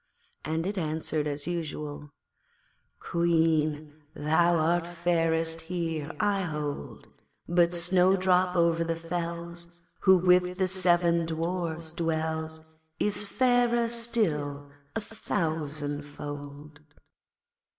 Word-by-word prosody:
and 160 +2 -2
it 200 0 -2
answered 155 -1 -1
as 145 0 -3
usual 150 -3 -4 0.9
'Queen, 155 -3 +1
thou 170 +3 +3
art 170 +1 +2
fairest 165 -1 0
here, 165 -4 -2
I 205 -2 +2
hold, 150 - -5 0.4
But 175 0 +3
Snowdrop 185 +1 +3
over 170 -1 +3
the 165 0 -1
fells, 170 0 -5 0.2
Who 190 -1 +6
with 180 0 +3
the 190 -1 +2
seven 175 -2 +2
Dwarfs 165 0 -2
dwells, 160 -1 -3 0.2
Is 210 0 0
fairer 240 +1 +2
still 160 -12 -1 0.2
a 225 - -1
thousandfold.' 145 -6 -4
165 Hz, 95 wpm, -28 LUFS, 155-180 Hz, 0.9 s, Who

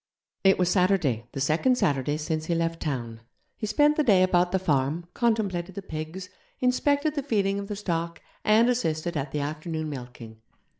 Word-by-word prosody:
It 195 0 +5
was 180 -1 +2
Saturday, 180 - +2
the - - -4
second 160 - +2
Saturday 145 - +1
since 155 0 -3
he 170 - +1
left 165 0 -1
town. 120 -6 -4 0.3
He 215 - -4
spent 295 +8 +3
the 305 - +3
day 195 -8 +5
about 180 -1 +2
the 190 - +2
farm, 155 -1 0
contemplated 195 -6 0
the 200 - -6
pigs, 160 +2 -6 0.3
inspected 285 +4 +2
the 290 - -2
feeding 200 -7 0
of 200 - -6
the 205 - -4
stock, 170 -4 -3 0.2
and 220 +2 +5
assisted 170 -9 -1
at 140 -1 -3
the 150 - -2
afternoon 155 +2 -4
milking. 120 -4 -9
175 Hz, 180 wpm, -26 LUFS, 150-205 Hz, 0.3 s, It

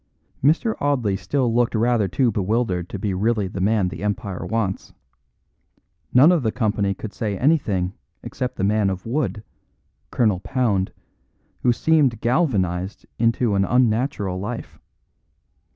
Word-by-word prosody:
Mr. 165 - +3
Audley 125 -9 +1
still 120 +5 -1
looked 120 0 +1
rather 115 -2 +2
too 120 +6 +1
bewildered 100 -3 -1
to - - -5
be 100 0 -2
really 105 +1 0
the 95 0 -5
man 100 -1 +2
the 95 - -8
empire 100 -2 -3
wants; 110 -4 -2 1.2
none 140 +7 +7
of 175 -4 +2
the 110 -3 0
company 105 -4 0
could 110 +1 -7
say 105 -4 -3
anything 105 - +1 0.3
except 125 0 -4
the - - -3
man 105 0 +2
of 95 -1 -5
wood 115 -3 -2 0.7
Colonel 105 -6 +1
Pound 105 -5 0 0.7
who 125 - +3
seemed 135 -3 +2
galvanised 100 - 0
into 115 -1 +2
an 100 0 +2
unnatural 115 -4 +1
life. 115 +5 -6
110 Hz, 135 wpm, -22 LUFS, 95-125 Hz, 1.2 s, none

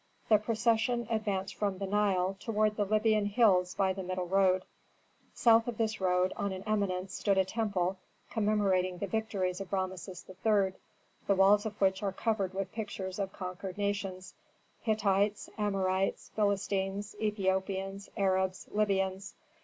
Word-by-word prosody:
The 215 -2 +6
procession 230 +2 +1
advanced 205 -4 -1
from 200 -3 -1
the 195 - -3
Nile 195 -2 +1
toward 215 -1 +1
the 205 - 0
Libyan 215 0 +2
hills 200 -5 +3
by 190 -1 +2
the 190 - -5
middle 185 0 -3
road. 185 0 +3 0.7
South 230 0 +5
of 235 -3 -3
this 220 -2 -1
road, 180 0 +2
on 200 - -2
an 190 0 -6
eminence, 195 -3 -1
stood 200 -2 +1
a 190 - +4
temple, 190 -3 -1 0.3
commemorating 200 -4 +1
the 200 - -2
victories 195 -3 -2
of 195 - -8
Rameses 185 -1 -3
III., 190 0 +1 0.5
the 200 - +4
walls 205 +2 +5
of 210 -1 -8
which 190 -1 +2
are 200 -2 -1
covered 200 -3 -1
with 195 -1 -3
pictures 200 -3 -5
of 195 -1 -2
conquered 185 0 -6
nations: 200 -2 -3 0.5
Hittites, 205 -2 +1
Amorites, 195 -2 0
Philistines, 200 -1 -1
Ethiopians, 195 -1 -1
Arabs, 190 -1 +1
Libyans. 195 -2 0
195 Hz, 145 wpm, -31 LUFS, 190-210 Hz, 0.7 s, The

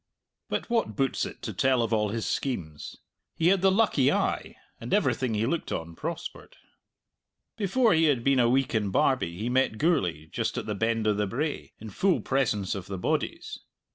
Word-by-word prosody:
But - - -2
what 230 - 0
boots 135 +2 0
it - - -12
to - - -4
tell 130 -2 +2
of 115 0 -1
all 105 -1 +1
his 115 +1 -3
schemes? 85 - -3 0.4
He 165 +1 +3
had 195 -1 +3
the 195 - +5
lucky 185 - +3
eye, - - -1 0.2
and - - -1
everything 125 -4 +1
he 105 +2 +1
looked 165 +6 -2
on 80 +1 -4
prospered. - - -6 1.0
Before 225 +2 +2
he 160 0 +4
had 135 -6 +2
been 135 0 +3
a 120 -1 +4
week 135 +1 +1
in 105 -3 +1
Barbie 130 - +1
he 110 +4 -3
met 125 -3 +1
Gourlay, 90 - +1
just - - -3
at - - -3
the 105 - -2
Bend 115 +2 0
o' 105 - +3
the 105 0 -1
Brae, 145 +8 -3
in 110 -1 -9
full 185 - +2
presence 115 -8 0
of 95 -2 -6
the 95 - -4
bodies. 330 - -2
125 Hz, 195 wpm, -27 LUFS, 105-155 Hz, 1.0 s, the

